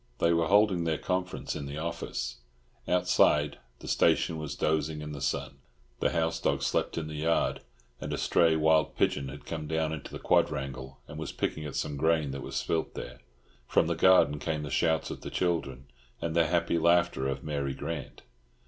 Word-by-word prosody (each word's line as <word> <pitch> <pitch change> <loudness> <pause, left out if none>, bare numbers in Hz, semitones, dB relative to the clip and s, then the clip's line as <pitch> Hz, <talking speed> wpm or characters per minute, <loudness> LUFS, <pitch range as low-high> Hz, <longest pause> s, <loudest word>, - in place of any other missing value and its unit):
They 85 - +3
were 85 -1 +2
holding 100 -3 +4
their 80 -2 0
conference 90 0 -2
in 70 - -5
the 70 +1 -6
office. 75 -7 -4 0.5
Outside, 75 -1 +3 0.2
the - - -9
station 80 - +2
was 75 -2 -5
dozing 80 0 0
in 75 0 -6
the 70 -2 -7
sun. 70 0 -2 0.4
The - - +2
house 80 -1 0
dog - - 0
slept - - 0
in 80 - -2
the 80 - -7
yard, 80 +2 +1 0.4
and - - -5
a - - -1
stray 80 -2 +3
wild 80 -1 +3
pigeon 70 -2 +1
had 75 +1 -10
come 80 -2 -5
down 80 0 0
into 75 -3 -7
the - - -5
quadrangle, 65 0 0
and 75 - -8
was 80 - -4
picking 80 - -3
at 75 - -6
some 75 - -2
grain 80 -1 +2
that 70 0 -5
was - - -7
spilt 80 -1 -1
there. - - -7 0.5
From - - +3
the - - 0
garden 90 -6 +5
came 75 -1 -2
the 75 - -6
shouts 80 0 +1
of - - -7
the - - -6
children 70 -8 -1 0.3
and 80 -1 -3
the 85 -1 +4
happy 85 -1 +1
laughter 85 -5 +3
of 70 0 -3
Mary 70 -3 -2
Grant. 80 -5 -6
80 Hz, 195 wpm, -29 LUFS, 70-85 Hz, 0.5 s, garden